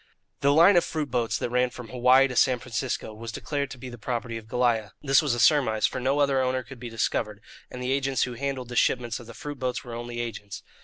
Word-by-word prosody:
The 140 - +3
line 170 +6 +6
of 175 - +5
fruit 150 -4 -3
boats 120 -2 0
that 120 - -3
ran 125 0 +2
from 125 -2 -10
Hawaii 130 +2 +5
to 125 - -6
San 130 +1 +4
Francisco 120 -1 -4
was 115 +1 -7
declared 140 +4 -3
to 135 - -9
be 130 - -8
the 120 -2 -9
property 120 0 -3
of 110 -1 -8
Goliah. 115 -4 0
This 135 -2 +5
was 145 -6 0
a - - -4
surmise, 120 -5 +4
for - - -1
no 135 +3 +1
other 140 -2 +3
owner 130 0 0
could 130 +1 -12
be 120 0 -6
discovered, 105 -2 -1 0.3
and 125 0 -7
the 125 - -1
agents 135 -1 +1
who 125 - -3
handled 130 0 -4
the 120 - -6
shipments 120 0 +1
of 120 - -12
the 115 - -11
fruit 145 -2 -7
boats 125 -1 -2
were 120 - -8
only 120 0 -5
agents. 110 -4 -6
125 Hz, 250 wpm, -26 LUFS, 120-135 Hz, 0.3 s, line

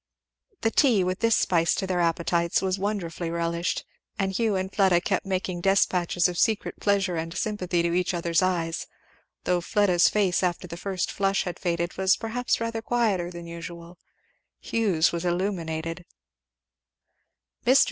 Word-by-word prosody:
The 225 - +1
tea, 230 -9 +4
with 185 +1 -2
this 230 -1 +3
spice 170 -2 +2
to 195 - -2
their 185 -1 -1
appetites, 170 0 +1
was 190 0 -1
wonderfully 180 -5 -3
relished; 170 +1 -2 0.3
and 195 -1 0
Hugh 215 +1 0
and 190 0 -3
Fleda 190 -4 +4
kept 195 +2 -1
making 185 -2 -2
despatches 180 -2 +2
of 175 -1 -4
secret 220 -2 0
pleasure 195 -4 +1
and 165 +2 -4
sympathy 185 -5 -1
to 170 0 0
each 180 0 0
other's 170 -1 +1
eyes; 170 -3 -1 0.6
though 180 -1 +1
Fleda's 185 -2 +3
face 195 -4 +1
after 180 0 -1
the 170 - -7
first 185 0 -3
flush 195 0 +1
had 180 -2 -5
faded 170 0 -2
was 190 0 +4
perhaps 235 +2 -1
rather 230 0 -3
quieter 220 -7 0
than 170 -1 -8
usual. 170 +1 -9 0.6
Hugh's 195 -8 +1
was 170 0 -3
illuminated. 175 -2 -2
180 Hz, 150 wpm, -26 LUFS, 170-195 Hz, 0.6 s, tea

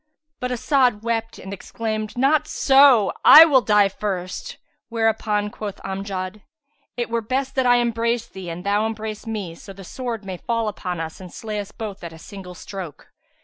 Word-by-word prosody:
But 250 - -2
As'ad 250 -3 +2
wept 225 -1 -2
and 195 - -8
exclaimed, 215 +2 -4
"Not 295 +4 +3
so: 270 -9 +5
I 315 +2 +11
will 275 -5 +4
die 210 -3 +4
first;" 190 -2 -5 0.3
whereupon 220 -2 0
quoth 205 -2 -6
Amjad, 195 0 -5 0.6
"It 240 -1 -3
were 235 0 0
best 260 +4 -2
that 260 -2 +1
I 245 - +6
embrace 235 -1 0
thee 190 -2 -8
and 170 +2 -7
thou 205 +2 +2
embrace 220 0 -6
me, 205 -6 -4
so 195 +4 -12
the 195 0 -12
sword 230 +1 -5
may 190 -2 -5
fall 230 +3 -2
upon 180 -4 -4
us 160 +2 -6
and 180 -2 -10
slay 215 -2 -5
us 205 0 -6
both 205 -4 -7
at 170 -1 -7
a - - -11
single 180 +1 -10
stroke." 180 -4 -9
215 Hz, 180 wpm, -22 LUFS, 195-235 Hz, 0.6 s, I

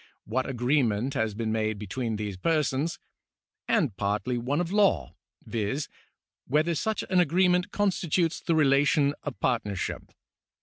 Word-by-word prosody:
what 130 +5 -1
agreement 125 -2 +1
has 110 -6 -1
been 110 0 -2
made 110 -1 0
between 110 +3 -3
these 105 -2 -4
persons), 155 - 0 0.7
and 155 - +1
partly 105 +6 -1
one 125 +5 -1
of 175 0 -2
law 195 - +2 0.3
(viz., 115 +6 -2 0.6
whether 155 +5 +2
such 215 +8 -1
an 185 - +4
agreement 180 +3 +3
constitutes 180 -5 0
the 165 - 0
relation 145 0 +3
of 145 - -6
partnership). 105 -7 -2
135 Hz, 130 wpm, -27 LUFS, 110-165 Hz, 0.7 s, an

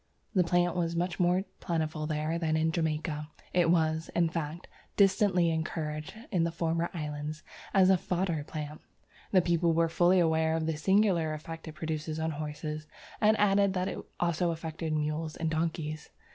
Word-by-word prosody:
The 185 -4 +4
plant 175 +1 +2
was 170 -1 0
much 175 0 -1
more 180 +1 +3 0.2
plentiful 155 -3 -2
there 155 +2 -1
than 160 -2 +1
in 160 +1 +2
Jamaica; 155 -2 -2 0.2
it 175 -2 +3
was, 160 -1 +2
in 170 -1 +3
fact, 160 +1 -4 0.3
distinctly 195 -4 +4
encouraged 155 0 -3 0.2
in 180 -5 +2
the 170 - 0
former 165 0 -1
islands 150 -2 -5 0.3
as 190 -1 +5
a 185 - +4
fodder 175 -4 -1
plant. 150 0 -6 0.5
The 185 -3 +5
people 170 -1 +2
were 165 0 +2
fully 175 +2 +4
aware 160 -1 +2
of 160 -1 -1
the 160 0 0
singular 175 -2 +2
effect 165 +2 -8
it 160 - -6
produced 155 0 -3
on 160 0 0
horses, 150 0 -5 0.3
and 215 0 +5
added 200 -1 +4
that 180 0 0
it - - -5 0.2
also 170 0 +1
affected 160 -1 -4
mules 155 +1 -1
and 160 -1 -2
donkeys. 155 -1 -2
165 Hz, 170 wpm, -30 LUFS, 155-175 Hz, 0.5 s, as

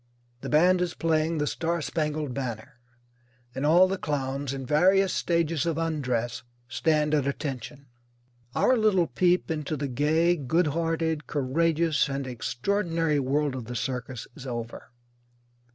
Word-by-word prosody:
The - - -6
band 175 +4 +4
is 175 -1 -2
playing 160 0 +1
"The 150 - 0
Star 170 +3 -1
Spangled 150 -3 -2
Banner," 125 0 -5 0.7
and 135 +3 -1
all 175 +4 +6
the 190 0 -3
clowns, 140 -2 -2
in 135 -1 -5
various 185 +7 +3
stages 170 -2 0
of 165 -2 0
undress, 125 -8 -1 0.3
stand 150 +2 +1
at 145 -3 +2
attention. 140 0 -5 0.7
Our 260 - +4
little 210 -6 +3
peep 180 0 +1
into 155 -1 -2
the 140 0 -2
gay, 155 +6 +2
good 160 +5 +1
hearted, 165 -1 -1
courageous, 155 +2 +1
and 135 0 -3
extraordinary 165 - -1
world 140 +1 0
of 130 -3 -5
the 125 +2 -6
circus 125 -1 -4
is 135 -4 -9
over. 120 0 -6
150 Hz, 140 wpm, -27 LUFS, 135-165 Hz, 0.7 s, all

